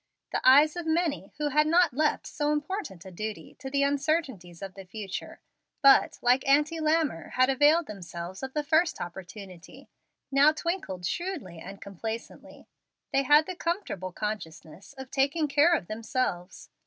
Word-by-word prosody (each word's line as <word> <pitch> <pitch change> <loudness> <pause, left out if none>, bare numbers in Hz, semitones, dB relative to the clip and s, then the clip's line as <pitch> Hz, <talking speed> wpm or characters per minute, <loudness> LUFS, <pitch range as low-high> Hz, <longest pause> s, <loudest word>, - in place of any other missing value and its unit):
The - - -1
eyes 290 +5 +6
of 345 -2 -5
many 320 -2 0
who 300 0 -1
had 300 +2 +3
not 340 -2 +4
left 300 +3 0
so 295 0 -1
important 295 - -4
a 190 - -9
duty 215 +4 -6
to 265 - -6
the 280 +1 +1
uncertainties 275 - -1
of 195 -1 -7
the 195 - -10
future, 195 +1 -7 0.4
but, 275 0 +6
like 250 +2 +4
Auntie 300 +4 +3
Lammer, 310 - 0
had 255 +1 +3
availed 295 +5 +4
themselves 180 -4 -8
of 265 0 -6
the 300 - 0
first 320 +3 +2
opportunity, 180 0 -10 0.4
now 280 +3 +5
twinkled 310 - -4
shrewdly 310 - -4
and 195 +4 -10
complacently. 220 +4 -8 0.5
They 275 - +4
had 295 +3 +5
the 370 - -6
comfortable 335 - -3
consciousness 190 - -6
of 265 -1 -10
taking 280 +3 +1
care 295 +4 +4
of 205 - -3
themselves. 215 -4 -4
270 Hz, 155 wpm, -28 LUFS, 195-310 Hz, 0.5 s, eyes